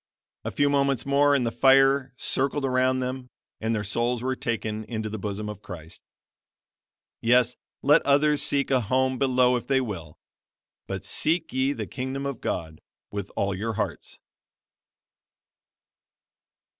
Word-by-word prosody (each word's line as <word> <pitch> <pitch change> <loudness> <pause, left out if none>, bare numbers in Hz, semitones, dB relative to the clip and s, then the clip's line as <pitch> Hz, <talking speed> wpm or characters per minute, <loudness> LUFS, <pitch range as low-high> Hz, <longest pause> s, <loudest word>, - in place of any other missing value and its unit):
A - - -2
few 145 - +1
moments 140 -3 +1
more 140 +1 +4
and 125 -3 +1
the 115 - 0
fire 135 +1 +4
circled 135 +1 -1
around 130 0 +2
them, 125 0 -4 0.3
and 110 +1 -1
their 105 - -2
souls 120 +4 -1
were 130 0 0
taken 110 -3 -3
into 110 -2 -4
the 110 - -4
bosom 105 +1 -4
of 105 -1 -7
Christ. 85 -4 -10 1.2
Yes, 125 +1 +4 0.3
let 150 +3 +6
others 145 +1 +3
seek 140 -1 +1
a 130 -2 +3
home 130 +3 +1
below 125 -2 +3
if 120 - -7
they 135 -1 +3
will, 95 -11 -5 0.7
but 95 0 -5
seek 160 - 0
ye 130 +1 +2
the - - -4
Kingdom 135 +1 -4
of 140 -4 -4
God 80 -1 -4 0.3
with 100 -1 -4
all 100 0 0
your 110 +4 -3
hearts. - - -4
125 Hz, 145 wpm, -26 LUFS, 110-135 Hz, 1.2 s, let